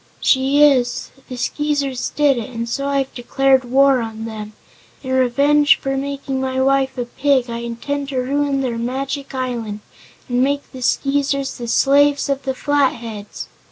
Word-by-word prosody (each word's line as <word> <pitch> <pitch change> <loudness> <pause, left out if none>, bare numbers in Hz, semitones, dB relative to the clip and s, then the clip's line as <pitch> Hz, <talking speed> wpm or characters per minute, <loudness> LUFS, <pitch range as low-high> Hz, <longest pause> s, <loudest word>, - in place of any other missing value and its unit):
"She 270 +2 +3
is. 255 -4 +2 0.2
The 255 - -6
Skeezers 285 -1 -1
did 285 -4 +3
it 225 - -6
and 230 -1 -4
so 275 +4 -2
I 280 0 0
have 270 -1 -2
declared 265 +1 +2
war 270 0 +4
on 225 -1 -6
them. 215 -1 -7 0.5
In 260 - -5
revenge 280 +3 +4
for 270 0 -2
making 275 -1 -3
my 260 0 -2
wife 270 0 +1
a 245 - -2
Pig 260 -1 0
I 235 - -4
intend 270 +4 -4
to 270 - -4
ruin 275 +2 0
their 240 -3 -2
Magic 270 +3 -4
Island 235 -5 -3 0.5
and 245 0 0
make 285 +1 -1
the 260 - -9
Skeezers 275 +1 0
the 240 - -5
slaves 285 +3 +3
of 275 0 0
the 265 -1 -1
Flatheads!" 235 -8 -2
265 Hz, 165 wpm, -19 LUFS, 245-280 Hz, 0.5 s, war